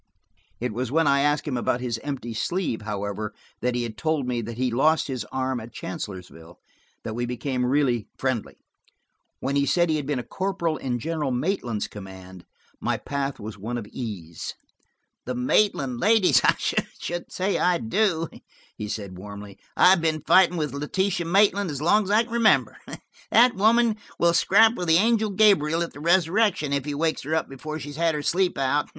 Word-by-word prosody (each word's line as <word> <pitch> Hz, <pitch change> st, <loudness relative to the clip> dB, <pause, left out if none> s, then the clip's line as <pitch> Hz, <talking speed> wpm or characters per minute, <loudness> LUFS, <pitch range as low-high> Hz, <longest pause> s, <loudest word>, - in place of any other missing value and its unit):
It 120 Hz, -2 st, -3 dB
was 125 Hz, +2 st, -3 dB
when 165 Hz, +2 st, +3 dB
I 140 Hz, 0 st, +4 dB
asked 145 Hz, +2 st, +1 dB
him 130 Hz, -4 st, -1 dB
about 120 Hz, 0 st, 0 dB
his 120 Hz, -2 st, -3 dB
empty 130 Hz, -3 st, -5 dB
sleeve, 140 Hz, -, -2 dB
however, 105 Hz, 0 st, -4 dB, 0.3 s
and 125 Hz, 0 st, 0 dB
he 120 Hz, -, 0 dB
had 115 Hz, -2 st, -6 dB
told 155 Hz, -4 st, 0 dB
me 120 Hz, -1 st, -1 dB
that 115 Hz, +1 st, -7 dB
he 130 Hz, 0 st, 0 dB
lost 155 Hz, +7 st, +3 dB
his 130 Hz, -4 st, -4 dB
arm 130 Hz, -1 st, -2 dB
at 115 Hz, +1 st, -10 dB
Chancellorsville, 90 Hz, -3 st, -8 dB, 0.5 s
that 110 Hz, -, -4 dB
we 120 Hz, +1 st, -2 dB
became 125 Hz, +1 st, -2 dB
really 125 Hz, -3 st, +1 dB
friendly. 130 Hz, -5 st, -2 dB, 0.8 s
When 135 Hz, +2 st, -1 dB
he 140 Hz, 0 st, +2 dB
said 175 Hz, -2 st, +2 dB
he 155 Hz, -, +1 dB
had 145 Hz, -2 st, -4 dB
been 145 Hz, -2 st, 0 dB
a 125 Hz, -, -3 dB
corporal 170 Hz, -3 st, -2 dB
in 125 Hz, -2 st, -2 dB
General 155 Hz, +1 st, -2 dB
Maitland's 125 Hz, -, -1 dB
command, 95 Hz, -2 st, -11 dB, 0.3 s
my -, -, -1 dB
path 140 Hz, -1 st, -3 dB
was 105 Hz, -1 st, -8 dB
one 120 Hz, +5 st, -4 dB
of 115 Hz, -, -5 dB
ease. 90 Hz, -10 st, -6 dB, 0.7 s
"The 125 Hz, -, -2 dB
Maitland 130 Hz, -, +1 dB
ladies! 220 Hz, -, +4 dB
I -, -, +4 dB
should 175 Hz, 0 st, -3 dB
say 190 Hz, +2 st, -1 dB
I 180 Hz, -1 st, +3 dB
do," 165 Hz, -, 0 dB, 0.5 s
he 105 Hz, -, -5 dB
said 100 Hz, -4 st, -6 dB
warmly. 100 Hz, 0 st, -10 dB, 0.2 s
"I've 180 Hz, -1 st, +6 dB
been 155 Hz, -2 st, 0 dB
fighting 180 Hz, -2 st, +5 dB
with 150 Hz, -3 st, -2 dB
Letitia 175 Hz, +5 st, -1 dB
Maitland 200 Hz, +1 st, +3 dB
as 145 Hz, -3 st, -4 dB
long 195 Hz, +7 st, +3 dB
as -, -, -6 dB
I 215 Hz, +3 st, +4 dB
can 230 Hz, 0 st, -10 dB
remember. 230 Hz, -2 st, +3 dB, 0.5 s
That 245 Hz, +1 st, +5 dB
woman 220 Hz, +2 st, +3 dB, 0.2 s
will 170 Hz, 0 st, +3 dB
scrap 220 Hz, +6 st, +5 dB
with 180 Hz, -7 st, -4 dB
the 160 Hz, 0 st, +5 dB
angel 220 Hz, +2 st, +2 dB
Gabriel 185 Hz, -6 st, +3 dB
at 170 Hz, -, -7 dB
the -, -, -11 dB
resurrection, 170 Hz, -1 st, +2 dB
if 140 Hz, -1 st, -1 dB
he 145 Hz, -1 st, -3 dB
wakes 160 Hz, +2 st, 0 dB
her 155 Hz, +3 st, -2 dB
up 160 Hz, -, 0 dB
before 155 Hz, +3 st, -6 dB
she's 145 Hz, -1 st, -8 dB
had 165 Hz, -1 st, +1 dB
her 150 Hz, -, -3 dB
sleep 180 Hz, +4 st, +1 dB
out." 135 Hz, +2 st, 0 dB
145 Hz, 190 wpm, -25 LUFS, 120-175 Hz, 0.8 s, I've